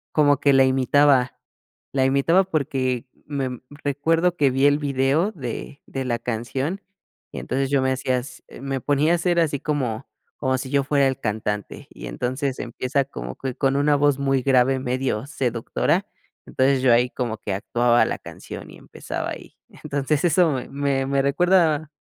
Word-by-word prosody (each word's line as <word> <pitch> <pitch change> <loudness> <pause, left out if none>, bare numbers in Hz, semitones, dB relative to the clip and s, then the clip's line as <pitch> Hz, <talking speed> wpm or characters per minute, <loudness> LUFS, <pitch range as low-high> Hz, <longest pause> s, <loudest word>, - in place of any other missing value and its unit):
como 145 -2 +4
que 140 -1 +3
la 135 0 +6
imitaba. 130 0 +3 0.5
La 130 -1 +2
imitaba 140 +8 +3
porque 135 -7 -1 0.2
me 135 -4 -3 0.2
recuerdo 165 +5 +1
que 140 -3 +3
vi 135 +2 +3
el 145 0 +3
video 140 +7 +1
de 140 - -7
de 135 -1 -4
la 120 -1 -1
canción, 130 - -3 0.5
y - - -6
entonces 135 +1 -2
yo 140 -2 +3
me 130 - +1
hací 130 0 -4 0.5
me 135 -1 -2
ponía 145 +3 +2
a - - +4
hacer 175 0 +1
así 150 -4 +1
como 135 -6 -2 0.3
como 130 -1 0
si 130 - -6
yo 140 0 +2
fuera 140 -1 +2
el 130 0 -2
cantante, 105 -3 -4
y - - -9
entonces 130 +2 -3
empieza 130 +3 -1
como 140 - -7
que 130 -2 -4
con 135 -1 +1
una 145 +1 +3
voz 145 -1 +2
muy 135 -1 +1
grave, 130 0 +3
medio 130 -3 -2
seductora, 135 - -1 0.4
entonces 130 0 +1
yo 130 - +5
ahí 125 +1 +3
como 120 -4 -3
que 100 - -4
actuaba 120 +4 +2
la - - -2
canción - - -10
y - - -13
empezaba - - -6
ahí, - - -10 0.3
entonces 140 +2 0
eso 170 -1 +4 0.2
me 140 -1 0
me 140 0 +1
recuerda, 160 0 +2
135 Hz, 170 wpm, -23 LUFS, 130-145 Hz, 0.5 s, la